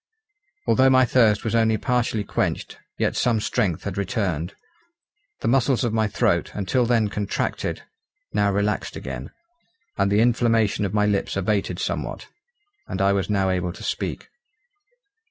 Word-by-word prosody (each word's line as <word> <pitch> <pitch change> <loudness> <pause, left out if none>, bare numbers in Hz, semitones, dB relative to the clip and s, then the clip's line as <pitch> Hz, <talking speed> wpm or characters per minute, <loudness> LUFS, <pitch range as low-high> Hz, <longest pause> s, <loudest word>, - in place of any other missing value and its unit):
Although 130 0 +4
my 130 -1 +5
thirst 110 -5 +3
was 115 - -2
only 110 -1 +3
partially 120 -4 0
quenched, - - -2 0.2
yet - - 0
some 120 -3 +2
strength 95 -5 -1
had 100 -1 -4
returned. 100 -5 -2 0.9
The - - -1
muscles 130 +1 +2
of 120 -3 0
my 110 -1 +2
throat, 105 - +1
until 115 +5 +1
then 115 -3 +3
contracted, 100 0 -3 0.5
now 100 -1 +2
relaxed 100 +1 -1
again; 65 +1 -6 0.7
and 100 0 +2
the 105 - +3
inflammation 115 -3 +2
of 95 - -3
my 105 0 +3
lips 100 -1 0
abated 100 +1 0
somewhat; - - -3 0.6
and 95 - -4
I 100 0 +3
was 100 0 -1
now 95 -2 +1
able 90 -1 -1
to - - -11
speak. - - -3
105 Hz, 150 wpm, -23 LUFS, 100-115 Hz, 0.9 s, my